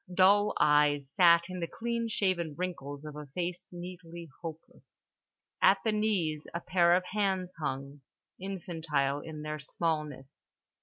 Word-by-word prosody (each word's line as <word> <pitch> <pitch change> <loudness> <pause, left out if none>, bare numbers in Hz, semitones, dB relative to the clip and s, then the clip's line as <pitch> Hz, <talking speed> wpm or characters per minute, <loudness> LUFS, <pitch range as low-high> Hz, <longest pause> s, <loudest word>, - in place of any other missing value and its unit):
Dull 200 +3 +5
eyes 145 -2 +3
sat 170 -2 +6
in 185 -1 -6
the 170 - -2
clean 235 +4 -2
shaven 185 -8 0
wrinkles 150 -5 -5
of 150 -1 -7
a 150 -1 -7
face 180 +1 -3
neatly 175 -2 -9
hopeless. 165 -1 -10 0.6
At 195 - +6
the 220 - +2
knees 190 -8 0
a - - 0
pair 175 -1 +4
of 180 - +1
hands 190 -3 0
hung, 140 -1 -4 0.4
infantile 160 -7 -1
in 155 0 -8
their 155 0 -4
smallness. 150 -3 -4
170 Hz, 140 wpm, -30 LUFS, 150-185 Hz, 0.6 s, sat